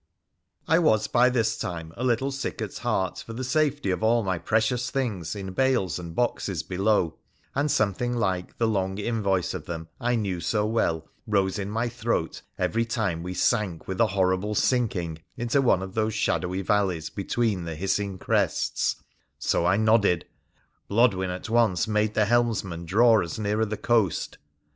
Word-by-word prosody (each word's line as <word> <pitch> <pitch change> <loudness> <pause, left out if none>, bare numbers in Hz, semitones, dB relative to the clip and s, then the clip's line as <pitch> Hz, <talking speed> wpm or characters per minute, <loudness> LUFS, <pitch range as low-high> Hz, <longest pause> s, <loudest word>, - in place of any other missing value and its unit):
I 165 +2 +4
was 110 -10 +3
by 125 +2 +4
this 115 -2 +1
time 80 -2 -5
a 125 - -5
little 130 +2 +1
sick 135 +1 -4
at 110 -4 -4
heart 100 -6 -1
for 115 - -8
the 125 +3 -4
safety 145 -4 +1
of 90 - -2
all 115 +1 +3
my 95 -3 -1
precious 115 +7 +1
things 110 - -2
in 95 -2 -6
bales 125 -8 +1
and 85 -2 -8
boxes 100 -8 -1
below, 90 -1 0 0.3
and 140 +2 0
something 120 +2 0
like 95 -5 -1
the 115 - +2
long 95 -3 -1
invoice 100 -4 0
of - - -6
them 80 -1 -6
I 120 +1 +1
knew 100 -6 -1
so 105 +4 0
well 85 -8 0 0.2
rose 100 -2 +1
in 100 0 -3
my 115 +3 -1
throat 115 -7 -2 0.2
every 90 +6 +1
time 105 -7 -1
we 90 +1 -5
sank 100 -5 0
with 95 +4 -1
a 115 - +5
horrible 95 +1 0
sinking 95 -11 0 0.2
into 120 +4 +1
one 95 -8 +3
of 95 0 -7
those 110 -1 0
shadowy 95 -2 0
valleys 95 -5 0
between 100 -2 -1
the 80 -1 -4
hissing 95 +3 -1
crests - - 0 0.2
— - - -44
so 85 - +1
I 95 +2 +3
nodded. 110 -5 +3 0.6
Blodwen 100 -4 +3
at 90 0 -5
once 115 -6 +2
made 105 0 +1
the 105 - +3
helmsman 105 -7 0
draw 110 +4 +5
us 85 - -5
nearer 105 +1 0
the 110 0 -4
coast. 110 -8 0
105 Hz, 175 wpm, -26 LUFS, 95-115 Hz, 0.6 s, a